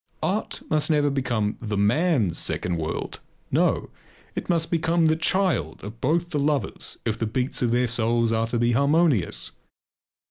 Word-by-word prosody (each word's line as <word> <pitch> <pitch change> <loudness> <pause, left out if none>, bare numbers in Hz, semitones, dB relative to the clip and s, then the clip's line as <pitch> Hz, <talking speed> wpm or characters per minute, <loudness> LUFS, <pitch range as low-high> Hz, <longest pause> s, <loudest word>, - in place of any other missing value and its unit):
Art - - -2
must 155 0 +1
never 145 -2 +3
become 120 -6 -1
the 105 -3 -3
man's 110 - +2
second 85 -1 -1
world. 80 -1 -4 0.3
No! - - +1 0.4
It - - -5
must 165 -2 +1
become 165 0 +2
the 160 0 +4
child 165 - 0
of 105 +4 -9
both 170 +5 0
the 150 - 0
lovers 145 -1 -1
if 110 -2 -1
the 115 - 0
beats 125 +4 -1
of 120 - +2
their 125 +1 +2
souls 115 0 +1
are 115 0 +1
to 120 - -2
be 120 +1 +2
harmonious. 140 - +2
125 Hz, 165 wpm, -24 LUFS, 110-155 Hz, 0.4 s, the